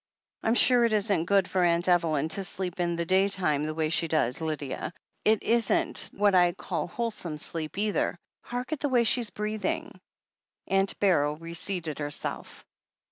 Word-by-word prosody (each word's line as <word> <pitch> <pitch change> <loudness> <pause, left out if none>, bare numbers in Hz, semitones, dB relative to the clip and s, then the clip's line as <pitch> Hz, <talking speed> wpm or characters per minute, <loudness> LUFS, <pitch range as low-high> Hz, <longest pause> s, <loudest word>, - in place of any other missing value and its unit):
"I'm 225 - +1
sure 245 -1 +5
it 230 -2 +2
isn't 200 -5 +1
good 195 0 +3
for 185 -1 +1
Aunt 170 0 +2
Evelyn 165 -4 +2
to 195 +4 -2
sleep 185 -1 -4
in 170 -1 0
the 170 0 -2
day 190 +2 +3
time 155 -7 0
the 155 - -4
way 155 -1 0
she 165 -1 +2
does, 155 -4 0
Lydia. 155 0 -4 0.3
It 215 0 +3
isn't 320 +9 +2
what 205 0 +2
I 175 -1 +4
call 170 -3 -4
wholesome 185 -6 -4
sleep 155 +2 -4
either 210 -3 0
— - - -30
^hark 245 +3 -4
at 310 - -2
the 290 - -1
way 245 -2 +3
she's 235 -1 +2
breathing 210 -3 -4 0.3
!" - - -59
Aimt 195 0 +1
Beryl 150 -7 +2
reseated 165 -1 -4
herself. 145 0 -5
185 Hz, 180 wpm, -27 LUFS, 165-210 Hz, 0.3 s, sure